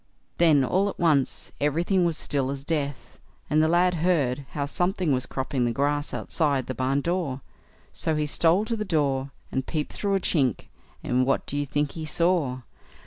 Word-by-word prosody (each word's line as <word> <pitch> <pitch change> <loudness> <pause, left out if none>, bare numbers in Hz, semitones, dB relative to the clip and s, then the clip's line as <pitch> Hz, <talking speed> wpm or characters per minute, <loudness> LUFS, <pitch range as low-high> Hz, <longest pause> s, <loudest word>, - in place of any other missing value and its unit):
Then 155 -5 +5
all 190 +9 +1
at - - -7
once 150 -6 +1
everything 170 +5 +2
was 170 -2 0
as - - -3
still 135 -2 0
as 135 0 -4
death, 145 -4 -3 0.3
and 155 +1 +4
the 155 - +3
lad 175 +2 +3
heard 150 -6 0
how 145 -1 -1
something 180 +2 0
was 130 0 -1
cropping 130 -1 -2
the 120 - +1
grass 145 +4 0
outside 140 -6 0
the 130 - -4
barn 130 +3 0
door, 165 -5 -2 0.5
so 160 - 0
he 150 0 0
stole 170 +7 +2
to 230 - -1
the 215 - -2
door, 140 -7 0 0.2
and 130 0 -2
peeped 155 -3 -3
through 200 -1 0
a - - +2
chink; 135 - 0 0.3
and 125 +1 +1
what 135 - +1
do - - -5
you 145 0 -1
think 145 +1 0
he 160 -1 -6
saw? 160 -7 +1
150 Hz, 195 wpm, -26 LUFS, 135-170 Hz, 0.5 s, Then